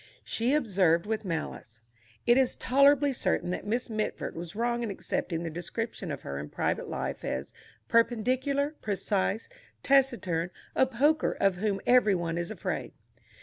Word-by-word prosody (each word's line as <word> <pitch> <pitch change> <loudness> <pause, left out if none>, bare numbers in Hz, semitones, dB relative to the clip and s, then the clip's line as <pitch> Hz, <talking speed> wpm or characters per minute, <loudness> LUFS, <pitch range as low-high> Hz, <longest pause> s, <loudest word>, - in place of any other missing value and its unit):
She 245 +5 +1
observed 190 - +2
with 220 +1 -2
malice. 120 -9 -5 0.4
It 240 - +6
is 260 -1 +3
tolerably 280 +1 +4
certain 180 - 0
that 180 - -4
Miss 240 +4 -1
Mitford 215 -2 -3
was 170 +2 -7
wrong 235 +1 0
in 230 - -2
accepting 170 -3 -3
the 165 - -4
description 185 +2 -4
of 140 - -5
her 70 0 -4
in 75 +1 -6
private - - -1
life - - -4
as 65 +2 -4 0.3
"perpendicular, 255 +5 +2
precise, 200 +1 -1 0.4
taciturn, 240 -12 +2 0.3
a 260 - +4
poker 290 +6 +2
of 195 -2 +3
whom 200 0 -1
every 245 -5 +5
one 170 -1 -2
is 175 - -3
afraid." 220 - -4
215 Hz, 150 wpm, -29 LUFS, 175-250 Hz, 0.4 s, It